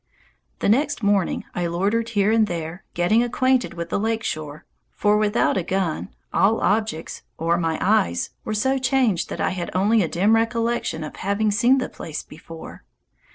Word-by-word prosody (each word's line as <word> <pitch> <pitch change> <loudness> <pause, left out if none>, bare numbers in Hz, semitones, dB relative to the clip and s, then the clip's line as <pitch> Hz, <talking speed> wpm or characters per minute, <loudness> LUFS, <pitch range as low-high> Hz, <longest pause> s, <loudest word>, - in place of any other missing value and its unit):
The - - +1
next 260 +3 +1
morning 200 -2 +1
I 175 -1 -1
loitered 205 +7 0
here 200 +1 +4
and 220 -1 +3
there, 170 0 -5
getting 175 +7 +3
acquainted 250 -3 +1
with 170 0 -5
the - - 0
lake 225 +1 -1
shore, 155 -4 -5 0.2
for 210 0 +1
without 210 0 +2
a 185 - 0
gun 185 -1 -2 0.2
all 220 +3 +3
objects, 215 -5 -1 0.2
or 165 +1 +1
my 165 -2 0
eyes, 180 - +1
were 215 - -3
so 265 +5 +1
changed 255 -8 +1
that - - -5
I - - +1
had 175 -1 -4
only 210 +4 +3
a 175 - +1
dim 195 +7 +2
recollection 230 -6 0
of 150 - -8
having 205 +2 0
seen 240 +5 +4
the 260 - -1
place 155 -2 -7
before. 165 +1 -11
205 Hz, 175 wpm, -23 LUFS, 170-225 Hz, 0.2 s, here